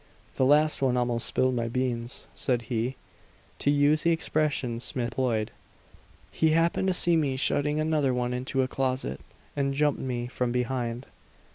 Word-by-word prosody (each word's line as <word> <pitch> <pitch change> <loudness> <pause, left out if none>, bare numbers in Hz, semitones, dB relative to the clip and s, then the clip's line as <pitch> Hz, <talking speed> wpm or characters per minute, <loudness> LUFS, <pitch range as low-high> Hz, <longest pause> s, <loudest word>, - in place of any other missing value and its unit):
"The 130 - +2
last 150 +1 +4
one 130 -2 +2
almost 120 -1 +1
spilled 130 0 +1
my 115 -1 -1
beans," 120 0 -3
said 125 -3 -1
he 120 +3 -1 0.6
to - - +1
use 145 +1 +3
the 170 - +2
expression 150 -7 0
Smith 120 +1 -2
employed. 115 -4 -1 0.8
"He 160 - +2
happened 170 +3 +1
to - - +3
see 175 -1 +3
me 145 -5 +1
shutting 150 +2 +1
another 155 -3 +1
one 125 0 -1
into 130 +1 -1
a - - -1
closet, 130 - -2 0.3
and 140 -1 0
jumped 150 0 +1
me 120 -2 -3
from 125 0 -2
behind. 125 0 -2
130 Hz, 160 wpm, -27 LUFS, 120-145 Hz, 0.8 s, last